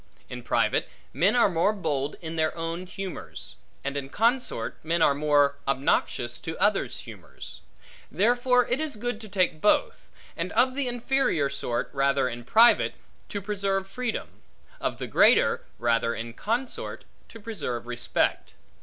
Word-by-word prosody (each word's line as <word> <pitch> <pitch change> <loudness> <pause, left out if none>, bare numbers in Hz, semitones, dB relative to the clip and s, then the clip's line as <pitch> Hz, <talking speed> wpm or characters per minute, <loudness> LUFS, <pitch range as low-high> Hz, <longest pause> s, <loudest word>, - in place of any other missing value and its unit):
In - - -6
private, - - +1 0.2
men - - +3
are 240 - +5
more 185 +3 +2
bold 150 -8 -2
in 165 -1 -6
their 160 0 0
own 165 +2 -4
humors; 190 0 -7 0.3
and 140 +1 -3
in 135 -1 -4
consort, 230 - 0
men 165 +2 0
are 150 - +5
more 145 -1 +3
obnoxious 125 -3 0
to 160 - -6
others' 205 +1 +1
humors; - - -11 0.5
therefore 245 +3 +3
it 245 - 0
is 310 -5 -2
good 230 +1 -4
to 215 - -9
take 180 -5 0
both; 210 - +1 0.3
and - - -3
of 255 +2 +3
the 275 -1 -1
inferior 245 - +1
sort, 140 -3 -2
rather 135 -1 +2
in 120 -1 -6
private, 230 - +5 0.3
to 205 -2 -4
preserve 195 -1 -1
freedom; 245 +3 -5 0.4
of - - -2
the - - -4
greater, - - +4
rather 115 0 +1
in 115 0 -6
consort, 235 - -3 0.2
to 230 - -12
preserve 155 - -4
respect. 120 0 -1
185 Hz, 150 wpm, -26 LUFS, 140-230 Hz, 0.5 s, are